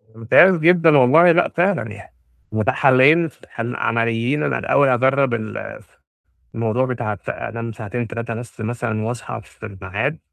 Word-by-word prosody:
ممتاز 145 +11 +5
جدًا 165 -2 +4
والله 155 +7 +6
لأ، 175 +1 +2
فعلًا 175 - -1
يع 100 - -13 0.4
متاح 110 0 -1
حالّين 145 +6 +4
ف - - -17 0.2
عمليّين 115 +3 -1
أنا - - -1
الأول 140 -1 +2
هاجرّب 130 0 +2
الف 110 -2 -7 0.6
الموضوع 115 +3 -1
بتاع 120 -4 -4
ف - - -10
أنام 115 0 -6
ساعتين، 115 +2 -6
3 115 +1 -6
بس 120 0 -9
مثلًا 110 -1 -3
وأصحى 120 +1 -6
في 110 - -13
الميعاد، 105 +9 -4
120 Hz, 145 wpm, -19 LUFS, 110-140 Hz, 0.6 s, والله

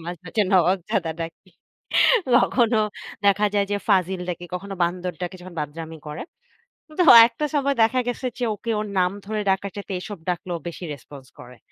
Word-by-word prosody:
মাঝ 175 - -4
মাঝে 210 +6 0
নবাবজাদা 180 -2 +2
ডাকি। 165 +3 -7 0.9
কখনো 240 -2 +3 0.5
দেখা 200 +1 +4
যায় 200 -1 +2
যে - - +2
ফাজিল 190 -2 +2
ডাকি, 175 0 -4
কখনো 195 +2 -5
বান্দর 180 +1 -1
ডাকি, 180 +1 -4
যখন 180 0 -11
বাদরামি 160 +2 -6
করে। 150 +1 -6 0.8
তো - - +6 0.2
একটা 245 +6 -4
সময় 280 -1 +1
দেখা 255 +3 +2
গেছে 245 +1 -3
যে 245 - 0
ওকে 230 +3 -4
ওর 210 - -3
নাম 180 0 +2
ধরে 215 +1 -2
ডাকার 195 +1 0
চাইতে 200 -1 -6
এসব 200 +1 -7
ডাকলে 180 0 -3
ও - - -11
বেশি 170 - -10
response 140 -2 -13
করে। 125 0 -12
190 Hz, 175 wpm, -23 LUFS, 170-210 Hz, 0.9 s, তো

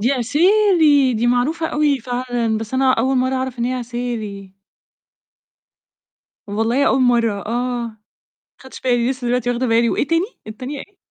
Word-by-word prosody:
دي 245 +6 +2
عسيلي 305 - +3
دي 230 +2 0
معروفة 285 +7 +1
أوي 295 -3 +1
فعلًا، 245 -2 -2
بس 225 +3 -6
أنا 260 0 +3
أول 260 +3 +1
مرة 260 +1 +1
أعرف 260 -1 -3
إن 235 - 0
هي 255 - -1
عسيلي. 230 -6 -5 1.9
والله 225 +7 0
أول 265 - +2
مرة 235 -3 +3
آه، 240 +1 -2
ما 220 - -15 0.7
خدتش 265 - -12
بالي 245 -1 +1
لسه 255 -2 -3
دلوقتي 245 0 0
واخدة 245 +1 -1
بالي 230 0 +3
وإيه - - -1
تاني؟ 330 +3 +1 0.2
التانية 255 +6 -6
إيه؟ 400 +5 -13
250 Hz, 155 wpm, -19 LUFS, 235-270 Hz, 1.9 s, عسيلي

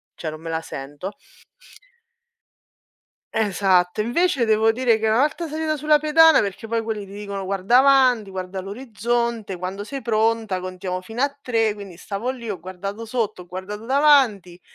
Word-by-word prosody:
cioè 160 - -5
non 155 - -10
me 165 - -7
la 160 0 -2
sento." 145 +5 -7 2.2
Esatto, 190 -3 +2
invece 265 +2 +1
devo 220 0 +3
dire 235 -1 +2
che, 220 - 0
una 220 +1 +3
volta 305 +3 0
salita 310 0 -2
sulla 300 +1 +3
pedana 315 +2 +6
perché 205 +2 -3
poi 230 0 -1
quelli 220 -2 -4
ti 195 - -12
dicono: 200 -1 -5
"Guarda 195 +6 +3
avanti, 260 -6 +4
guarda 190 0 -5
l'orizzonte, 230 -1 -2
quando 185 +3 -5
sei 270 +3 -7
pronta 220 -3 +1
contiamo 185 0 -5
fino 225 +7 -3
a 280 0 0
3." 225 -4 +1
Quindi 200 -4 -10
stavo 205 +6 -4
lì, 245 -3 -6
ho 185 - -6
guardato 195 +5 -6
sotto, 220 -5 -2
ho 180 - -12
guardato 195 +5 -7
davanti 260 -11 +3
215 Hz, 165 wpm, -22 LUFS, 190-245 Hz, 2.2 s, pedana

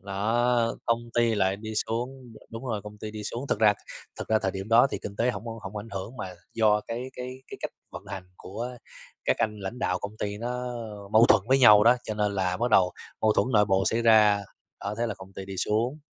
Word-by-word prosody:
Đó, 115 +4 +1
công 115 0 +2
ty 120 -1 +3
lại 95 -1 +1
đi 110 +1 -7
xuống, 125 +1 -4
đ - - -14
đúng 115 +3 -7
rồi, 110 -4 -2
công 105 0 -10
ty 110 0 -6
đi 105 0 -7
xuống. 120 +3 -4
Thực - - 0
ra, 105 -1 +6 0.5
thực - - -6
ra 110 - +4
thời 95 - +1
điểm 95 +2 -6
đó 115 +3 +6
thì - - -3
kinh 100 - -6
tế 120 +3 +2
hổng 120 - -7
hổng 110 -3 -7
ảnh 105 +2 -6
hưởng, 100 +6 -5
mà 95 -6 -6 0.2
do 105 -2 +4
cái 125 +3 -4
cái 130 +1 -7
cái - - -8
cách - - -3 0.2
vận - - -7
hành 95 -1 -6
của 110 +6 -6 0.6
các - - +2
anh 105 -1 0
lãnh 100 +6 -5
đạo 90 -6 0
công 105 +2 -7
ty 105 0 -3
nó, 120 +2 -3
ơ, 110 -5 -6
mâu 115 +2 +7
thuẫn - - +6
với 135 - +5
nhau 105 -4 +8
đó, 120 +2 +6
cho 110 - -3
nên 105 -1 0
là 90 -1 0
bắt 120 +1 -1
đầu 90 -3 +5 0.3
mâu 110 -1 +4
thuẫn - - +2
nội 105 -1 +5
bộ 95 -1 +2
xảy 115 +1 +2
ra, 105 -3 +5 0.4
đó 100 - -2
thế 120 - +1
là 110 - -3
công 95 0 -13
ty 95 - -7
đi 95 0 -7
xuống. 115 +10 0
110 Hz, 250 wpm, -27 LUFS, 100-120 Hz, 0.6 s, nhau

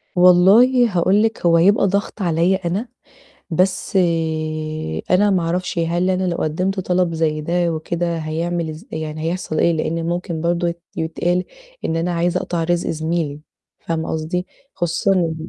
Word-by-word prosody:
والله 200 +8 +6
هاقول 195 +5 +3
لِك، 225 -5 -1
هو 170 -1 +5
يبقى 200 +4 +4
ضغط 200 +2 -2
عليّا 175 +2 +1
أنا. 205 +8 -2 0.6
بس 185 +3 0 1.1
أنا 200 +3 +4
ما 185 -3 +2
أعرفش 175 +1 -2
هل 170 +2 +1
أنا 185 0 0
لو 175 -2 -1
قدّمت 185 +5 -1
طلب 180 -2 0
زَي 155 -1 0
ده 170 +2 0
وكده، 170 +1 -2
هيعمل 165 +1 -2
إز 155 +7 -10
يعني 155 0 -4
هيحصل 165 -1 -2
إيه؟ 170 - +3
لإن 165 +1 -2
ممكن 175 -1 -3
برضه 170 +1 0
يت 170 0 -6
يتقال 175 +2 -1 0.4
إن 165 - -1
أنا 175 +2 -1
عايزة 170 +1 0
أقطع 170 -2 -2
رزق 175 0 0
زميلي، 160 -2 -2 0.4
فاهمة 160 -1 -3
قصدي؟ 160 +3 -2 0.3
خصوصًا 175 -1 +1
170 Hz, 150 wpm, -20 LUFS, 165-185 Hz, 1.1 s, والله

